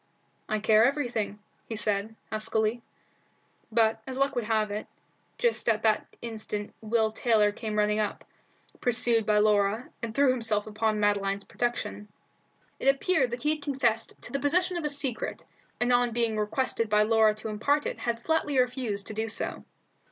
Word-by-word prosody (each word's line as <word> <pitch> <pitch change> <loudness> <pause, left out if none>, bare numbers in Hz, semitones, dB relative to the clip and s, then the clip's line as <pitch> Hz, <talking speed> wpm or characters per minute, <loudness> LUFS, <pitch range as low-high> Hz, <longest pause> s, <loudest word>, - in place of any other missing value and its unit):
"I 215 - +1
care 215 +1 +4
everything," 240 -7 0 0.3
he 225 - -3
said, 210 0 -1 0.2
huskily. 220 +1 0 0.9
But, 220 0 +3
as 260 -1 -4
luck 275 0 +2
would 240 -3 -2
have 215 -1 +1
it, 210 +1 -4 0.5
just 475 - +1
at 220 -1 +1
that 220 -1 +2 0.2
instant 215 -2 -5
Will 220 0 +1
Taylor 220 -2 +3
came 215 0 -4
running 210 0 +2
up, 210 -1 -2 0.5
pursued 235 -2 +2
by 210 -1 +4
Laura, 210 +2 +2
and 230 -2 -5
threw 280 -2 +5
himself 225 -4 0
upon 215 0 -1
Madeline's 200 -1 +1
protection. 220 -3 -3 0.7
It - - -2
appeared 275 0 +3
that 240 +1 -5
he 300 - +3
had 305 -1 -2
confessed 245 -6 -1
to 245 - -5
the 275 - 0
possession 360 +6 +1
of 340 -3 -3
a - - +1
secret, 280 -4 -2 0.3
and 245 0 +2
on 245 -1 +3
being 230 -1 +1
requested 220 +1 0
by 210 0 +4
Laura 220 -1 +4
to 215 +1 -6
impart 280 +8 +1
it - - -3
had 235 -1 -2
flatly 320 -3 +1
refused 245 -5 0
to - - -6
do 220 +1 -2
so. 205 - -3
225 Hz, 170 wpm, -28 LUFS, 215-250 Hz, 0.9 s, threw